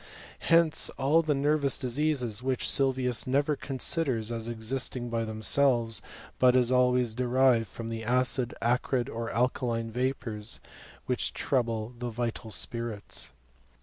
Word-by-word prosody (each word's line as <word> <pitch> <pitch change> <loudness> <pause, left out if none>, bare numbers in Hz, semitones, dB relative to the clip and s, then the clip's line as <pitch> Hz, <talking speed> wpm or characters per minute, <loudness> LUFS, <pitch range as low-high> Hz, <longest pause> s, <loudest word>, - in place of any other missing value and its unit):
Hence 165 -1 +3
all 140 +5 +3
the 155 -3 0
nervous 140 0 +1
diseases, 125 -4 0
which 130 0 0
Sylvius 130 -3 +2
never 145 +3 +1
considers 130 -4 -1
as 115 -1 -3
existing 120 +1 -3
by 115 -1 -1
themselves; 115 +1 +2 0.4
but 125 -1 +5
as 125 -1 +3
always 125 -2 +3
derived 125 -1 +2
from 115 +4 -7
the 115 0 -5
acid, 125 +1 +1
acrid, 125 +1 0
or 115 0 -4
alka^ 125 +4 0
line 115 -2 -2
vapours 120 -3 -3 0.5
which - - -1
trouble 115 -3 -1
the 120 0 -3
vital 115 0 -4
spirits. 110 - -1
125 Hz, 130 wpm, -28 LUFS, 115-130 Hz, 0.5 s, but